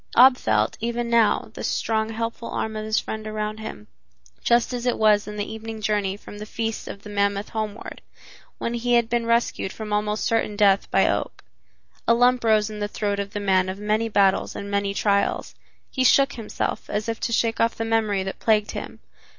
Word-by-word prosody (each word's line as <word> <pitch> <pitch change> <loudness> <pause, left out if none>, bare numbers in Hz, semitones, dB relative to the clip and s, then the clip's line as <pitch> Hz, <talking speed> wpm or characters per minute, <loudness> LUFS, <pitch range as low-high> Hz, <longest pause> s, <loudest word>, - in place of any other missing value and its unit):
Ab 255 +2 +8
felt, 110 - 0
even 235 +1 -2
now, 230 -2 +3
the - - -7
strong, 220 -1 0
helpful 230 +1 -4
arm 220 0 -3
of 215 0 -4
his 220 0 +1
friend 215 0 -6
around 215 0 -3
him, 220 - -7 0.6
just 235 +1 +3
as 245 0 -3
it 245 - +1
was 210 -1 +3
in 210 - -6
the 205 -1 -2
evening 220 0 -7
journey 205 -2 0
from 205 0 -11
the 210 - -6
Feast 225 0 -3
of 200 - -8
the 210 - -9
Mammoth 200 0 0
homeward, 215 -1 -5 0.6
when 235 - -3
he 240 +1 +1
had 235 -1 +2
been 235 -1 0
rescued 230 -4 +1
from 215 -1 -6
almost 210 +1 0
certain 225 -2 0
death 200 -2 +3
by - - +3
Oak. - - -2 0.6
A 230 - +5
lump 245 +1 +3
rose 215 -2 +3
in 215 -1 -7
the 205 - -1
throat 205 -1 -2
of 200 0 -4
the 205 - -2
man 190 -2 +2
of 190 - -4
many 215 +2 0
battles 195 -2 +2
and 200 0 -6
many 200 0 0
trials. 200 -1 0 0.4
He 260 - 0
shook 275 +2 +5
himself, 225 -3 -4
as 210 +1 -2
if 230 0 -2
to - - -2
shake 225 0 +1
off 230 0 +2
the 225 - -3
memory 220 -4 +1
that 195 - -6
plagued 215 -2 +2
him. - - -7
215 Hz, 205 wpm, -24 LUFS, 205-230 Hz, 0.6 s, Ab